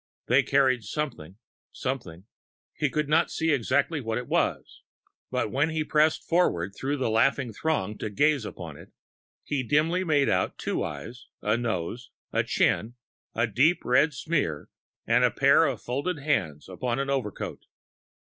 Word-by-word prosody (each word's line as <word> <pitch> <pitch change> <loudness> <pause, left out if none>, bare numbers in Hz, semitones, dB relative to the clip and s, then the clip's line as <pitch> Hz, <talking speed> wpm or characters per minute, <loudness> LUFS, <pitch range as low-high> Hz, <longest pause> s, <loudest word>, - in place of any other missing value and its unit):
They 130 +4 +4
carried 130 -3 +2
something... 105 - -5 0.3
something... 100 -10 -5 0.5
he 150 - 0
could 150 +1 -1
not 160 +3 +3
see 160 0 0
exactly 140 +3 +1
what 115 -2 -2
it 125 - -4
was. - - -1 0.5
But 105 - -1
when 145 +4 +1
he 160 -1 -1
pressed 155 +1 +2
forward 100 - +1
through 140 +5 -2
the 130 -4 0
laughing 120 +1 +2
throng 105 -7 -2
to - - -3
gaze 145 +5 +2
upon 85 -8 -8
it, - - -14 0.5
he 145 -2 -1
dimly 155 +8 +1
made 145 -5 +2
out 90 - 0
two - - -2
eyes, 120 +2 -7 0.2
a 105 +1 +2
nose, 115 0 -3 0.2
a - - +2
chin, 115 +3 +1 0.4
a 115 - +2
deep 140 - +2
red 135 +4 +3
smear, 120 - -2 0.4
and - - +3
a - - +5
pair - - +4
of - - -1
folded 145 +8 -2
hands 135 - -1
upon 120 +6 -3
an 140 0 -1
overcoat. 130 -7 -3
130 Hz, 155 wpm, -27 LUFS, 110-150 Hz, 0.5 s, a